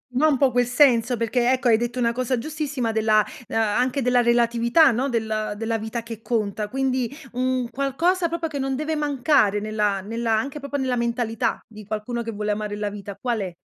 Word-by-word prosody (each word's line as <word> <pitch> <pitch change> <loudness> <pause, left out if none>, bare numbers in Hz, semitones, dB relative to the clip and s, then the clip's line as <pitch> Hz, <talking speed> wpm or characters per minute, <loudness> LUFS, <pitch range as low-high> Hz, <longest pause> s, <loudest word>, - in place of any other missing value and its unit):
no, 310 +4 +4
un 285 -4 +3
po' 270 -2 +3
quel 245 0 +2
senso, 245 -1 +3
perché 240 +2 +1
ecco 255 -1 +1
hai 220 - +5
detto 240 +2 -3
una 235 -1 +2
cosa 255 +1 -1
giustissima 285 -3 -3
della 215 -1 +3 0.2
ehm, - - -3
anche 250 +5 +1
della 250 0 +3
relatività, 235 +4 +4
no, 255 +4 0
del 220 -3 -2
della 225 +1 -2
vita 220 +1 -5
che 230 -1 -8
conta. 215 -2 -2
Quindi 260 0 -1 0.2
un 255 -1 -1
qualcosa 335 +7 +1
proprio 330 0 -3
che 290 -3 -5
non 270 0 -1
deve 305 +3 -2
mancare 275 -8 +2
nella 210 -2 0
nella 225 +2 -2
anche 275 +6 -2
proprio 280 0 -6
nella 260 -3 0
mentalità 235 0 -1
di 215 -2 -11
qualcuno 215 +3 -3
che 230 0 -4
vuole 210 0 -2
amare 210 0 -3
la 205 0 -2
vita 200 -1 -8
qual 235 +2 -2
è? 190 -3 -4
235 Hz, 200 wpm, -23 LUFS, 220-265 Hz, 0.2 s, hai